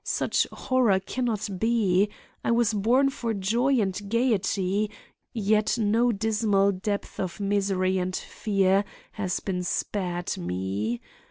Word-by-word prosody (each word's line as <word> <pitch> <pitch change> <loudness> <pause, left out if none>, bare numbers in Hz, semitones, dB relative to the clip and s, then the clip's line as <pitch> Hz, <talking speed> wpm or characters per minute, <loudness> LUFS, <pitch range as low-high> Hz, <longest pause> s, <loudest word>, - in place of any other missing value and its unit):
Such - - +1
horror 245 -7 +2
can 245 +6 -3
not 220 -4 -1
be. 210 -3 +2 0.3
I - - -1
was 230 -1 +3
born 245 +7 +3
for 230 -4 -3
joy 235 +7 +2
and 195 -3 +1 0.2
gaiety; 210 -3 +1 0.4
yet 215 -1 +1
no 230 +2 +3
dismal 210 -2 +2
depth 200 +2 -4
of 180 -1 -3
misery 195 -2 +1
and 185 0 -2
fear 195 -1 +1 0.3
has 190 -4 -2
been 185 -2 -2
spared 180 -1 -2
me! 95 +6 -2
205 Hz, 125 wpm, -26 LUFS, 185-225 Hz, 0.4 s, was